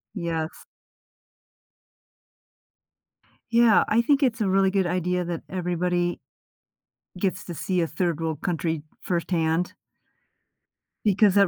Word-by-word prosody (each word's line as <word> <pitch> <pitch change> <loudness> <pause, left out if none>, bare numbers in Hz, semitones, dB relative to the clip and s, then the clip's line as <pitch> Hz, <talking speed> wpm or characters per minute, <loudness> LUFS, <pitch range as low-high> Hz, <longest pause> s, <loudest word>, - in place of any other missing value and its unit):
Yes. 165 -3 -3 2.9
Yeah. 235 -1 +6
I 225 +2 +4
think 280 +3 +3
it's 240 -3 +1
a 200 - +2
really 195 0 +3
good 190 -2 +1
idea 180 0 0
that 170 -1 -3
everybody 175 -1 0 1.0
gets 185 -1 -1
to 175 - -7
see 180 +2 -1
a 165 - +1
third-world 160 -2 -1
country 165 -3 -2 0.2
firsthand 170 -1 0 1.3
because 205 -1 +4
that 200 -1 +6
180 Hz, 105 wpm, -25 LUFS, 170-195 Hz, 2.9 s, Yeah